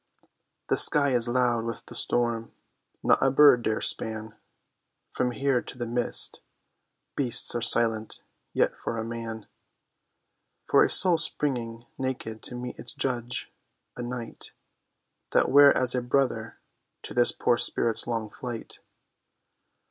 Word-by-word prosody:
The -, -, +1 dB
sky 140 Hz, -2 st, +6 dB
is 120 Hz, -1 st, +1 dB
loud 120 Hz, -2 st, 0 dB
with 115 Hz, 0 st, -7 dB
the -, -, -12 dB
storm; 115 Hz, -1 st, -2 dB, 0.5 s
not -, -, +2 dB
a 135 Hz, -, +3 dB
bird 135 Hz, -2 st, +5 dB
dare 110 Hz, -1 st, -2 dB
span 110 Hz, 0 st, -1 dB, 0.8 s
From 125 Hz, -, -2 dB
here 130 Hz, 0 st, -1 dB
to -, -, -9 dB
the 120 Hz, -, -4 dB
mist; 120 Hz, +1 st, +1 dB, 0.7 s
beasts 125 Hz, -5 st, +2 dB
are 120 Hz, -, -3 dB
silent; 115 Hz, -2 st, +2 dB, 0.3 s
yet -, -, 0 dB
for 115 Hz, -, -6 dB
a 110 Hz, -, -3 dB
man, 115 Hz, -1 st, -7 dB, 1.2 s
For -, -, +3 dB
a -, -, +3 dB
soul 175 Hz, -3 st, +5 dB
springing 120 Hz, -7 st, -2 dB
naked 120 Hz, -4 st, -5 dB
to 125 Hz, -, -9 dB
meet 125 Hz, 0 st, -8 dB
its 120 Hz, -, -8 dB
judge, 125 Hz, -2 st, -3 dB, 0.4 s
a -, -, -7 dB
night 120 Hz, -1 st, -8 dB, 0.8 s
That -, -, +2 dB
were 145 Hz, +1 st, +7 dB
as 125 Hz, -1 st, +2 dB
a 125 Hz, -, -1 dB
brother 130 Hz, +2 st, -2 dB, 0.5 s
to -, -, -6 dB
this 120 Hz, 0 st, +3 dB
poor 120 Hz, -, 0 dB
spirit's 115 Hz, -1 st, -1 dB
long 115 Hz, -3 st, -4 dB
flight. 120 Hz, -3 st, -8 dB
120 Hz, 140 wpm, -25 LUFS, 115-125 Hz, 1.2 s, were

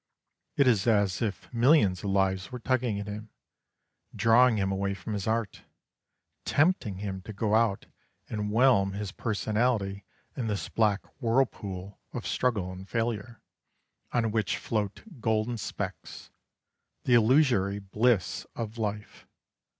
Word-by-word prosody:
It 140 Hz, -, +4 dB
is 115 Hz, -4 st, +3 dB
as 100 Hz, -5 st, +2 dB
if 110 Hz, +2 st, -3 dB
millions 120 Hz, -, +4 dB
of -, -, -8 dB
lives 95 Hz, +2 st, +1 dB
were 125 Hz, -, -4 dB
tugging 125 Hz, -4 st, 0 dB
at 100 Hz, -, -4 dB
him, 105 Hz, +1 st, -7 dB, 0.9 s
drawing 115 Hz, 0 st, +5 dB
him 95 Hz, -1 st, 0 dB
away 100 Hz, 0 st, -1 dB
from 95 Hz, +4 st, -6 dB
his 100 Hz, -1 st, -3 dB
art, 110 Hz, -2 st, -1 dB, 0.8 s
tempting 145 Hz, -, +1 dB
him 95 Hz, -1 st, -4 dB
to 110 Hz, -, -8 dB
go 105 Hz, +1 st, -1 dB
out 110 Hz, -3 st, +2 dB, 0.4 s
and 105 Hz, -1 st, -3 dB
whelm 110 Hz, -5 st, +4 dB
his 100 Hz, -1 st, -4 dB
personality 105 Hz, -2 st, -1 dB, 0.3 s
in 125 Hz, -5 st, -3 dB
this 105 Hz, -2 st, -2 dB
black 105 Hz, -3 st, +1 dB, 0.2 s
whirlpool 105 Hz, -6 st, -1 dB
of -, -, -5 dB
struggle 105 Hz, -8 st, 0 dB
and 95 Hz, +1 st, -10 dB
failure, 115 Hz, 0 st, -2 dB, 0.7 s
on 115 Hz, -2 st, +1 dB
which 105 Hz, -2 st, 0 dB
float 105 Hz, -3 st, -3 dB, 0.2 s
golden 110 Hz, +1 st, 0 dB
specks -, -, -6 dB, 0.7 s
the 125 Hz, -, +2 dB
illusory 120 Hz, -4 st, +4 dB
bliss 105 Hz, +1 st, 0 dB
of 115 Hz, 0 st, -5 dB
life. 105 Hz, -1 st, -4 dB
105 Hz, 135 wpm, -28 LUFS, 100-120 Hz, 0.9 s, drawing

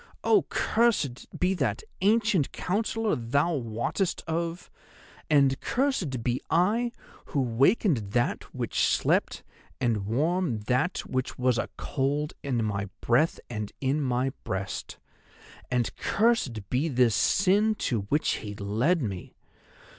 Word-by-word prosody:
Oh, 420 Hz, -, +4 dB
cursed 215 Hz, -, +1 dB
be 180 Hz, +1 st, +2 dB
that 130 Hz, -, -1 dB, 0.2 s
ancient 210 Hz, -, +3 dB
Counsellor 220 Hz, +3 st, -1 dB
thou 140 Hz, +8 st, +1 dB
wottest 120 Hz, -, -2 dB
of, 170 Hz, +1 st, -3 dB, 0.6 s
and 140 Hz, -3 st, +4 dB
cursed 190 Hz, -, -1 dB
be 125 Hz, +1 st, 0 dB
I 215 Hz, +8 st, +2 dB, 0.3 s
who 145 Hz, -, -2 dB
wakened 135 Hz, -, +3 dB, 0.2 s
That 120 Hz, 0 st, 0 dB
which -, -, -3 dB
slept, -, -, +2 dB, 0.4 s
and 115 Hz, -6 st, 0 dB
warmed 145 Hz, -, 0 dB
That 125 Hz, -, 0 dB
which 130 Hz, 0 st, -3 dB
was 125 Hz, -2 st, +2 dB
a -, -, -2 dB
cold 145 Hz, +3 st, -1 dB
in 120 Hz, -5 st, -1 dB
my 100 Hz, -2 st, -2 dB
breath 130 Hz, +8 st, +2 dB
and 105 Hz, -3 st, -5 dB
in 140 Hz, +3 st, 0 dB
my 130 Hz, 0 st, 0 dB
breast! 95 Hz, +1 st, -4 dB, 0.7 s
And 125 Hz, -2 st, 0 dB
cursed 175 Hz, -, +1 dB
be 135 Hz, +6 st, +1 dB
this 125 Hz, -6 st, +3 dB
sin 205 Hz, -, +3 dB
to 120 Hz, -, +1 dB
which 150 Hz, +2 st, +1 dB
he 105 Hz, -1 st, -7 dB
led 115 Hz, -, +1 dB
me! 95 Hz, -5 st, -5 dB
135 Hz, 125 wpm, -27 LUFS, 120-180 Hz, 0.7 s, Oh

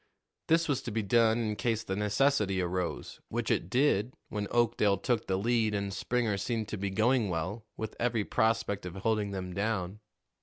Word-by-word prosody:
This 165 Hz, +1 st, +3 dB
was 145 Hz, -4 st, 0 dB
to 120 Hz, -, -5 dB
be 110 Hz, 0 st, -1 dB
done 115 Hz, +2 st, +4 dB
in 110 Hz, -3 st, -1 dB
case 115 Hz, -1 st, -1 dB
the 95 Hz, -, -3 dB
necessity 105 Hz, -1 st, +2 dB
arose, 90 Hz, 0 st, -3 dB
which -, -, -1 dB
it 85 Hz, -, 0 dB
did 125 Hz, -2 st, +2 dB
when 105 Hz, -1 st, -3 dB
Oakdale 115 Hz, -4 st, +2 dB
took 115 Hz, +2 st, -1 dB
the 95 Hz, -, +1 dB
lead 110 Hz, 0 st, +1 dB
and 100 Hz, -1 st, -2 dB
Springer 115 Hz, -2 st, 0 dB
seemed 110 Hz, +1 st, -2 dB
to 110 Hz, -, -3 dB
be 100 Hz, 0 st, -1 dB
going 110 Hz, +2 st, +2 dB
well, 95 Hz, +7 st, -3 dB
with 110 Hz, -1 st, -5 dB
every 120 Hz, -3 st, +1 dB
prospect 110 Hz, -4 st, 0 dB
of 90 Hz, -, -8 dB
holding 105 Hz, +1 st, 0 dB
them 95 Hz, -2 st, -5 dB
down. 100 Hz, -1 st, -2 dB
105 Hz, 185 wpm, -30 LUFS, 100-115 Hz, -, done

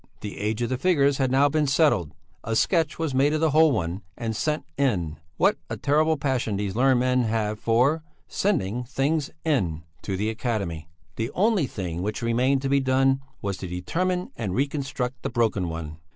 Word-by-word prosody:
The 105 Hz, -, -6 dB
age 110 Hz, +3 st, -1 dB
of 120 Hz, -, -1 dB
the 130 Hz, -1 st, -2 dB
figures 140 Hz, -4 st, +3 dB
had 130 Hz, -1 st, +2 dB
now 135 Hz, +2 st, +4 dB
been 150 Hz, 0 st, +1 dB
settled; 135 Hz, -, +2 dB, 0.3 s
a 115 Hz, -, -2 dB
sketch 160 Hz, -, +2 dB
was 160 Hz, -4 st, -2 dB
made 140 Hz, +3 st, +3 dB
of 155 Hz, -, +1 dB
the 160 Hz, -1 st, +2 dB
whole 160 Hz, +1 st, +5 dB
one 90 Hz, -5 st, -2 dB, 0.2 s
and 115 Hz, -1 st, -3 dB
"sent 150 Hz, +6 st, -1 dB
in" 95 Hz, -, 0 dB, 0.2 s
(what -, -, +3 dB
a -, -, -4 dB
terrible 155 Hz, +2 st, +2 dB
passion 130 Hz, -7 st, -1 dB
these 100 Hz, -1 st, -3 dB
learned 130 Hz, +1 st, +4 dB
men 130 Hz, 0 st, +2 dB
have 110 Hz, -1 st, -1 dB
for 125 Hz, +9 st, +2 dB, 0.3 s
"sending 125 Hz, -, 0 dB
things 135 Hz, +4 st, -1 dB, 0.2 s
in") 90 Hz, -, 0 dB, 0.2 s
to 95 Hz, -2 st, -3 dB
the 105 Hz, +3 st, 0 dB
Academy; 100 Hz, -, -3 dB, 0.3 s
the 115 Hz, +1 st, -1 dB
only 200 Hz, -, +2 dB
thing 90 Hz, -6 st, -4 dB
which 105 Hz, +4 st, -3 dB
remained 130 Hz, +4 st, +2 dB
to -, -, 0 dB
be 140 Hz, 0 st, +4 dB
done 135 Hz, 0 st, +2 dB, 0.2 s
was 100 Hz, -1 st, -2 dB
to 95 Hz, -, -6 dB
determine 180 Hz, -, -2 dB
and 100 Hz, -5 st, -3 dB
reconstruct 135 Hz, -2 st, -2 dB
the -, -, -2 dB
broken 110 Hz, -7 st, 0 dB
one. 80 Hz, -1 st, -6 dB
125 Hz, 190 wpm, -25 LUFS, 105-145 Hz, 0.3 s, whole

